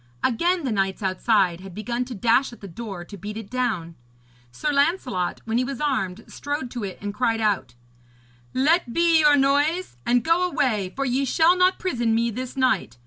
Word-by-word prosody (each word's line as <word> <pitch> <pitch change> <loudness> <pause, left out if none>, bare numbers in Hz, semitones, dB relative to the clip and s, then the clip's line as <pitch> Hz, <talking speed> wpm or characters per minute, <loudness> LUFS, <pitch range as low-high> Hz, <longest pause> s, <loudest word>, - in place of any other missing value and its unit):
Again 340 +8 +1
the 260 - -1
knights 195 -1 -1
outside 190 -2 +1
had 190 -2 -10
begun 235 +4 -2
to 245 -1 -7
dash 235 +6 +2
at 235 - -13
the 200 - -9
door 195 -2 -7
to 200 - -10
beat 210 +3 -7
it 220 -3 -8
down. 220 -10 -2 0.6
Sir 300 - -2
Lancelot, 280 - 0
when 225 +1 0
he - - +1
was 265 -1 -5
armed, 225 -9 -1
strode 285 -3 -4
to 240 -4 -5
it 190 -2 -5
and 205 0 -4
cried 230 0 0
out: 190 - 0 0.8
'Let 285 -1 +2
be 335 -1 +4
your 295 -2 +5
noise, 290 +6 +1
and 245 0 +2
go 345 +3 +2
away, 215 - 0
for 275 - -1
ye 260 +2 +1
shall 325 +6 +4
not 365 +1 +3
prison 240 -11 0
me 235 +1 +1
this 255 +4 -6
night. 255 - +1
240 Hz, 195 wpm, -24 LUFS, 205-285 Hz, 0.8 s, your